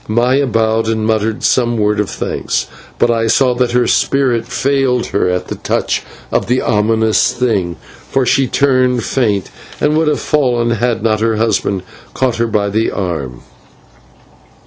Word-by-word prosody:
Maya 125 +5 +2
bowed 110 -1 +1
and 110 -1 -1
muttered 110 0 -1
some 120 -2 +2
words 105 0 +1
of 105 - -4
thanks, - - -2 0.3
but 120 - +2
I 115 -1 0
saw 125 +2 +3
that 120 -1 0
her 125 0 +3
spirit 125 -5 +1
failed 130 -1 0
her 95 - 0
at 90 0 -2
the - - -4
touch - - -1 0.3
of - - 0
the 125 +2 +2
ominous 110 +1 +2
thing, 100 -9 -1 0.3
for 135 -1 +1
she 135 +1 +2
turned 130 -3 +2
faint 105 -7 -1 0.3
and 150 +1 +1
would 160 0 +2
have 150 - +1
fallen 125 -6 +1
had 115 -1 -1
not 110 -2 +1
her 110 0 +1
husband 105 -3 0 0.3
caught 130 -3 0
her 115 0 +1
by 105 -2 0
the 110 +3 0
arm. 75 -10 -4
115 Hz, 165 wpm, -15 LUFS, 110-125 Hz, 0.3 s, saw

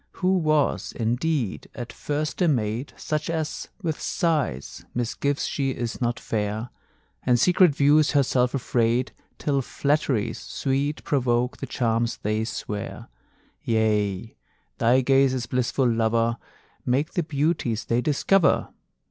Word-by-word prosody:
Who 185 0 +1
was, 155 -3 +1
indeed, 120 +1 -1
at 120 -2 -6
first 150 +4 -3
a 175 - +4
maid 120 -2 0
Such 150 0 -2
as, 160 -2 -3 0.2
with 160 -3 -2
sighs, 150 - -1
misgives 130 +4 -1
she 135 -2 -1
is 120 -2 -4
not 120 0 0
fair, 110 +2 -3 0.5
And 125 -1 +2
secret 180 0 +5
views 150 +2 +4
herself 130 -2 +2
afraid, 120 -1 +1 0.3
Till 140 -2 0
flatteries 135 -5 0
sweet 140 +2 -2
provoke 125 -3 +1
the - - -6
charms 115 -1 0
they 110 +1 -1
swear: 105 - -5 0.5
Yea, 110 -2 0 0.4
thy 120 +3 +4
gazes, 130 -1 +3
blissful 125 +1 0
lover, 115 0 +1 0.5
Make 135 +6 0
the 175 - +1
beauties 145 -7 -1
they 120 +1 +1
discover! 155 +6 +2
130 Hz, 120 wpm, -25 LUFS, 115-150 Hz, 0.5 s, secret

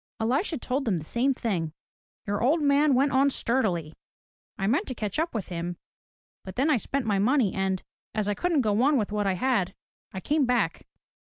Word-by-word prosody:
Elisha 275 - 0
told 265 +2 -2
them 205 -6 +1
the 155 - -6
same 245 - +1
thing. 180 - -2 0.5
"Your 205 0 -1
old 290 +8 +3
man 285 -1 +4
went 275 +2 +3
on 275 +1 +4
sturdily. 195 - 0 0.6
I 195 - -2
meant 275 - +1
to 255 - -5
catch 210 +3 -3
up 325 -4 -1
with 215 - -3
him, 175 0 -4 0.7
but 190 -1 -8
then 285 +5 +2
I 260 - +4
spent 270 +3 -2
my 205 -3 +1
money 235 -1 +2
and, 190 -1 -1 0.3
as 215 -2 0
I 205 - +1
couldn't 335 - +1
go 215 -1 +1
on 285 +2 +4
with 210 -4 -1
what 210 -1 0
I 195 - +2
had, 195 -2 0 0.4
I 190 - -5
came 290 - +1
back." 245 -1 0
235 Hz, 205 wpm, -27 LUFS, 195-275 Hz, 0.7 s, man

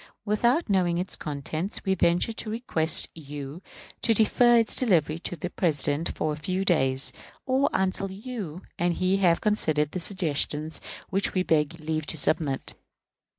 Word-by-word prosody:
Without 235 +9 +2
knowing 180 -4 +2
its 180 +2 -1
contents, 155 +7 -4
we 190 - +2
venture 175 +4 +2
to 220 - -4
request 175 -8 +1
you 145 +1 -8 0.4
to 225 - +3
defer 240 +3 +5
its 230 -2 +3
delivery 165 - +2
to 175 - -4
the 175 +3 -5
President 150 -2 0
for 155 -1 0
a - - -6
few 185 +5 -2
days, 135 -6 +2 0.3
or 265 +2 +2
until 190 +1 0
you 195 -4 -6 0.2
and 175 0 +1
he 185 +1 +1
have 175 -4 +3
considered 155 -8 +1
the 185 - -3
suggestions 160 -4 -1 0.3
which 195 +1 0
we 185 - +2
beg 160 0 +1
leave 155 -1 -3
to 160 - -3
submit. 145 -3 +1
175 Hz, 155 wpm, -26 LUFS, 155-200 Hz, 0.4 s, defer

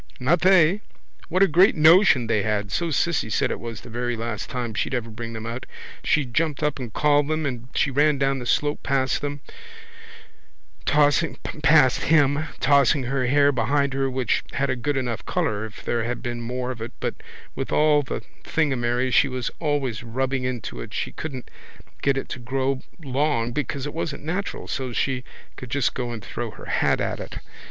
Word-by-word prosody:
Not 155 +7 +2
they! 185 +1 +5 0.5
What 185 +3 +4
a - - +6
great 180 +5 +5
notion 160 - +6
they 110 -2 +1
had! 105 -1 -1
So 170 +7 0
Cissy 160 -5 0
said - - +1
it - - -3
was 115 -3 -7
the - - -12
very 120 +1 -2
last 110 -3 -4
time 120 -3 -3
she'd 120 - -1
ever 115 -2 -3
bring 115 +1 -6
them 110 0 -6
out. 120 +2 -5 0.4
She 150 -3 +2
jumped 150 +4 -1
up 150 -2 0
and 120 -4 -6
called 145 +3 +3
them 155 0 -1
and 125 -3 -4
she 140 - +2
ran 145 +2 +3
down 135 0 +1
the 120 - -5
slope 145 +3 +1
past 135 -2 0
him, 145 0 -3 1.4
tossing 150 +2 +3 1.7
her 130 +1 -1
hair 145 +2 +4
behind 140 +3 +1
her 135 0 0
which 130 -3 0
had 140 -1 0
a - - 0
good 135 +3 -1
enough 120 -4 -2
colour 105 +1 -1
if 110 - -13
there 115 -1 0
had 120 +2 -3
been 120 -1 -3
more 125 +2 -3
of 120 -3 -8
it 115 - -6
but - - -2 0.4
with - - -4
all 150 -1 +4
the 135 - -5 0.2
thingamerry 130 -4 0
she 140 - +5
was 130 -2 -3
always 145 -8 -1
rubbing 130 +2 -2
into 120 - -4
it - - -8
she - - -2
couldn't 135 -5 -7 0.5
get 140 -1 +2
it 135 - -3
to - - -5
grow 130 +2 -1 0.2
long 135 -3 0
because 140 +1 -3
it 145 - -5
wasn't 160 -3 -4
natural 180 +6 -3
so 130 -2 -3
she 125 +1 -1 0.3
could 125 - -8
just 135 0 +1
go 125 -2 -3
and 110 -4 -7
throw - - -4
her - - -11
hat - - +1
at - - -2
it. - - -7
130 Hz, 190 wpm, -24 LUFS, 120-145 Hz, 1.7 s, a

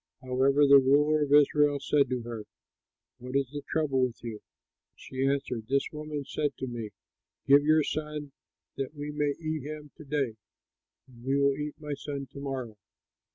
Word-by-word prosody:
However, 135 +3 +3
the 140 0 +9
ruler 150 +3 +4
of 145 -1 0
Israel 145 0 +5
said 140 -1 +2
to 125 -2 -2
her, 115 -2 -6 0.7
"What 125 +2 -7
is 140 -2 +1
the 145 0 -5
trouble 145 -4 +1
with 125 -2 -1
you?" 115 -3 -6 0.5
She 130 +1 -3
answered, 125 -5 -1
"This 140 +1 +1
woman 150 -2 -5
said 150 +1 -2
to 130 - -3
me, 120 -4 -5 0.6
'Give 140 +1 +6
your 155 +1 +4
son, 150 -1 -4 0.5
that 135 +2 -4
we 145 0 -5
may 145 -1 0
eat 155 -2 -3
him 150 +1 -8
to 160 - -10
day, 140 -6 -1 0.7
and 120 -2 -16
we 135 +2 +1
will 140 -1 +3
eat 150 +1 -4
my 150 -1 -4
son 140 -1 -5
to 140 - -9
morrow!' 130 -6 -5
140 Hz, 175 wpm, -29 LUFS, 130-150 Hz, 0.7 s, the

